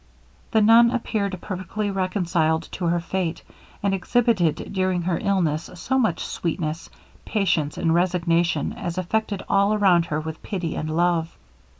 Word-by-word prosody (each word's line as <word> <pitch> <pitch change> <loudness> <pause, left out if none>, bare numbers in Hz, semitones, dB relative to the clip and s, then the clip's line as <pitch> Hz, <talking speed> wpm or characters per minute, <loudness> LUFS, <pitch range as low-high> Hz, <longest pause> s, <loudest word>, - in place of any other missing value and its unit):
The 220 - +3
nun 230 +2 +7
appeared 215 -5 -2
perfectly 200 +2 -3
reconciled 175 -4 0
to 180 - -4
her 170 +1 +2
fate, 175 -1 -3 0.4
and 200 -1 +1
exhibited 195 -5 +1
during 185 -2 0
her 175 -1 0
illness 170 -6 0
so 265 +9 0
much 215 -10 0
sweetness, 165 -1 -3 0.3
patience, 180 -9 0
and 165 -2 +1
resignation 175 -1 +1
as 170 0 -5
affected 200 +2 -1
all 200 +2 +3
around 185 -5 +4
her 150 -1 -1
with 160 0 -6
pity 180 -6 -3
and 155 - -3
love. 170 0 0
180 Hz, 140 wpm, -23 LUFS, 165-200 Hz, 0.4 s, nun